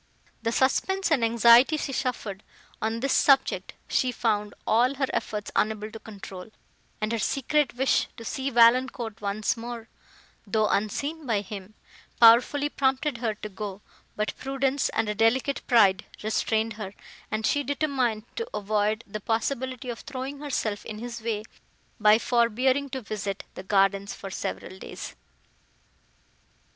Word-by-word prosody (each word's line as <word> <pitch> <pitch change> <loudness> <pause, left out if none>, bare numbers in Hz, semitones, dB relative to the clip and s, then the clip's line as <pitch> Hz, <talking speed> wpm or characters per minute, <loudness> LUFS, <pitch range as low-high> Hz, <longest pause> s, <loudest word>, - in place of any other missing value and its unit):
The 230 0 0
suspense 380 +10 +1
and 270 -7 +3
anxiety 235 +5 +6
she 280 -2 -3
suffered, 225 -7 -3 0.4
on 225 +1 -1
this 275 0 +1
subject, 275 -1 +3
she 255 - +1
found 210 -4 -1
all 245 +5 +3
her 270 0 +1
efforts 210 -1 -3
unable 215 0 0
to 225 - -8
control, 195 -3 -9 0.5
and 215 +1 -1
her 230 - 0
secret 275 +4 +1
wish 265 +2 +2
to 230 - -9
see 265 +4 -2
Valancourt 240 -2 +3
once 205 +1 0
more, 235 0 -7 0.6
though 215 +1 +2
unseen 280 +9 -1
by 215 -4 +1
him, 200 0 -9 0.4
powerfully 240 +5 +6
prompted 270 -1 0
her 225 -3 -1
to 210 - -7
go, 205 0 -7 0.3
but 210 0 -2
prudence 270 0 0
and 225 0 -1
a 210 - 0
delicate 235 +6 +2
pride 205 -6 +4 0.2
restrained 220 +1 0
her, 210 -2 -7 0.3
and 215 0 -2
she 290 +4 +2
determined 270 -6 0
to 460 -1 -3
avoid 210 +2 0
the 215 +1 -6
possibility 255 +3 -2
of 230 - -7
throwing 275 0 -6
herself 230 -8 -2
in 215 - -7
his 235 +1 -6
way, 220 -2 -2 0.6
by 210 0 +6
forbearing 250 +4 +2
to 260 -1 -5
visit 205 -2 -4
the - - -7
gardens, 195 0 +1
for 195 - -8
several 185 0 -5
days. - - -8
230 Hz, 145 wpm, -26 LUFS, 210-260 Hz, 0.6 s, anxiety